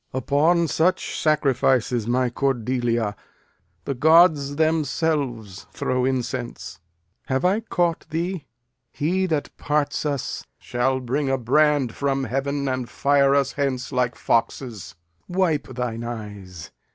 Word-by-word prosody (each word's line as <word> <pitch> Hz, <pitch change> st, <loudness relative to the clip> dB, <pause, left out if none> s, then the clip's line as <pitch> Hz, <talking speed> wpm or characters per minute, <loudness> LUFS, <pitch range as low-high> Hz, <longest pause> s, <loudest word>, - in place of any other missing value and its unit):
Lear. 130 Hz, -, -1 dB
Upon 165 Hz, +6 st, +3 dB
such 165 Hz, +4 st, 0 dB
sacrifices, 130 Hz, -6 st, +2 dB
my 125 Hz, 0 st, +1 dB
Cordelia, 120 Hz, -4 st, 0 dB, 0.7 s
The -, -, -1 dB
gods 155 Hz, 0 st, +4 dB
themselves 145 Hz, -, -1 dB
throw 130 Hz, 0 st, -1 dB
incense. 125 Hz, -2 st, -3 dB, 0.5 s
Have 130 Hz, +3 st, 0 dB
I 195 Hz, +4 st, +3 dB
caught 175 Hz, -8 st, -1 dB
thee? 170 Hz, -1 st, -3 dB, 0.4 s
He 185 Hz, +5 st, 0 dB
that 155 Hz, -4 st, -2 dB
parts 150 Hz, -1 st, -1 dB
us 145 Hz, -4 st, -3 dB
shall 130 Hz, +2 st, -1 dB
bring 135 Hz, +3 st, -1 dB
a 135 Hz, -, +2 dB
brand 135 Hz, 0 st, +2 dB
from 135 Hz, -1 st, -1 dB
heaven 140 Hz, +2 st, -2 dB
And 130 Hz, -2 st, -2 dB
fire 140 Hz, -1 st, +3 dB
us 140 Hz, -1 st, +2 dB
hence 135 Hz, -2 st, -2 dB
like 125 Hz, -2 st, 0 dB
foxes. 115 Hz, -6 st, -1 dB, 0.3 s
Wipe 175 Hz, -5 st, 0 dB
thine 120 Hz, -2 st, -4 dB
eyes. 105 Hz, -8 st, -8 dB
135 Hz, 120 wpm, -23 LUFS, 125-150 Hz, 0.7 s, gods